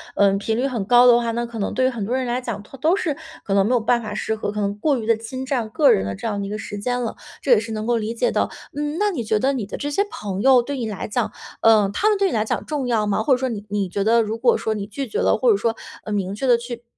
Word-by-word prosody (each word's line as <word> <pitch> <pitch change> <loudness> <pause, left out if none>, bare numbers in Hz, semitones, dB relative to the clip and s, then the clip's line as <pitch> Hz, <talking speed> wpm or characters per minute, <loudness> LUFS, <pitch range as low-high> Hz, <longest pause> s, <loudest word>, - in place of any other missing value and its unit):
呃 200 -1 +4
频 215 +3 -1
率 260 +3 +1
很 235 -7 -2
高 245 +4 +6
的 240 -1 +7
话， 235 -1 0
那 235 +1 -2
可 230 -2 -7
能 200 - -2
对 255 - +1
于 260 - +4
很 230 -5 -4
多 235 - -2
人 260 - -1
来 245 +1 -1
讲， 230 -5 -5
他 270 +6 -13
都 320 +7 +3
是 320 -7 0 0.3
可 195 - -1
能 195 0 +4
没 - - 0
有 245 - +4
办 235 +2 +1
法 215 - -5
适 220 - -2
合， 215 -1 -3
可 210 - -4
能 200 0 -1
过 275 +1 +1
于 220 - -5
地 230 - +4
侵 255 +4 -6
占 245 -5 -1
个 285 +5 +4
人 95 - 0
的 100 - -3
这 100 - -5
样 205 -2 -2
的 200 - -3
一 - - -6
个 210 - -3
时 205 -1 -6
间 245 +4 -1
了， 230 - -3 0.3
这 270 - 0
也 235 - +8
是 225 +1 -6
能 215 0 -3
够 240 - +2
理 225 0 -2
解 235 - +1
的。 - - 0 0.3
嗯， 295 +2 -2
那 415 -1 +2
你 245 -10 -3
觉 215 -1 +1
得 270 +3 +1
你 235 -7 -3
的 - - -6
这 290 - -3
些 395 +8 +1
朋 195 -2 -4
友 255 0 +6
对 285 +4 -4
你 230 -3 -3
来 200 - -5
讲， 230 +2 -1 0.3
呃， 215 -3 +5
他 425 - +2
们 420 - +2
对 395 -1 +2
你 - - -3
来 215 - +2
讲 - - -3
重 295 -4 -2
要 225 -4 +1
吗？ 205 +1 0
或 275 - 0
者 255 - +6
说 260 - -1
你 215 -5 -4
你 200 -2 -1
觉 200 +2 -2
得 230 +2 +4
如 220 +1 -2
果 240 +1 +3
说 220 - -1
你 205 -2 -4
拒 240 +6 -5
绝 430 - -3
了， - - +3
或 - - +2
者 - - +4
说， 230 -10 0 0.3
嗯， 215 - -4
明 195 -1 -2
确 265 - -3
地 245 -2 +6
去 240 0 -7
230 Hz, 355 characters per minute, -22 LUFS, 210-255 Hz, 0.3 s, 也